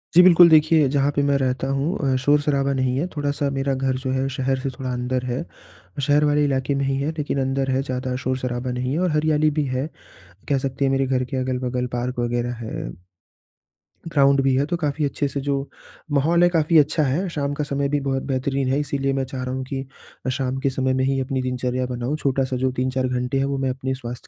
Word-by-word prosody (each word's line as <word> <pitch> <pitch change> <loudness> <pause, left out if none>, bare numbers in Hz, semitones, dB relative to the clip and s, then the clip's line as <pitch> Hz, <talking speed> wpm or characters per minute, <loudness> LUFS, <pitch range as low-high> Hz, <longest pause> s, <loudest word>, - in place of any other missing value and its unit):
जी, 180 - +10
बिल्कुल। 175 -1 +8
देखिए, 155 -1 +5
जहाँ 140 0 +2
पे 145 - +2
मैं 140 -1 +2
रहता 130 0 -1
हूँ 140 0 0
अ, - - +2
शोर-शराबा 145 0 +2
नहीं 130 -1 0
है, 150 - 0
थोड़ा 145 -1 0
सा 145 0 -1
मेरा 135 0 0
घर 130 0 0
जो 130 - -1
है, 130 +1 0
शहर 135 0 0
से 135 - -2
थोड़ा 130 -1 -5
अंदर 125 +1 -2
है। 125 0 -2
अ, 90 +9 -15
शहर 145 +2 +3
वाले 150 0 +3
इलाके 135 0 0
में 140 0 0
ही 135 - 0
है 145 +3 -1
लेकिन 145 -2 -1
अंदर 135 0 -1
है, 130 +1 +1
ज़्यादा 130 -1 -3
शोर-शराबा 125 -1 -2
नहीं 125 +1 -2
है 160 - 0
और 180 -3 +1
हरियाली 155 0 +2
भी 150 - +1
है, 130 +2 -2 0.6
कह 140 - +3
सकते 135 +1 -1
हैं 135 - +2
मेरे 135 0 +2
घर 130 -1 +1
के 135 - -1
अगल-बगल 125 -1 -1
पार्क 125 +1 -3
वगैरह 120 0 -1
है, 110 - -5 1.2
ग्राउंड 140 -1 +4
भी 135 -1 +3
है, 135 +2 +2
तो 175 +3 -2
काफ़ी 150 -2 -1
अच्छे 145 +1 -1
से 140 0 -4
जो 140 0 -2 0.4
माहौल 160 +5 +3
है, 175 - +6
काफ़ी 165 -1 +3
अच्छा 155 +2 +2
है। 150 +8 0
शाम 145 -3 -2
का 150 +1 -2
समय 140 0 -1
भी 145 0 +1
बहुत 135 0 -1
बेहतरीन 135 +1 -1
है, 140 - +2
इसीलिए 140 -2 -1
मैं 135 - 0
चाह 130 0 -5
रहा 130 0 -3
हूँ 130 - -3
कि 135 0 -4 0.4
अ, - - 0
शाम 130 0 -1
के 140 0 +1
समय 130 0 0
में 130 0 +1
ही 135 0 +1
अपनी 130 0 -2
दिनचर्या 125 0 -2
बनाऊँ, 125 +4 -3
छोटा-सा 135 -2 0
जो 130 - +2
3-4 130 0 0
घंटे 125 +1 -1
हैं, 135 - +1
वो 140 0 -1
मैं 135 -1 0
अपने 130 +1 -2
स्वास्थ्य 120 +1 -7
135 Hz, 235 wpm, -22 LUFS, 130-145 Hz, 1.2 s, जी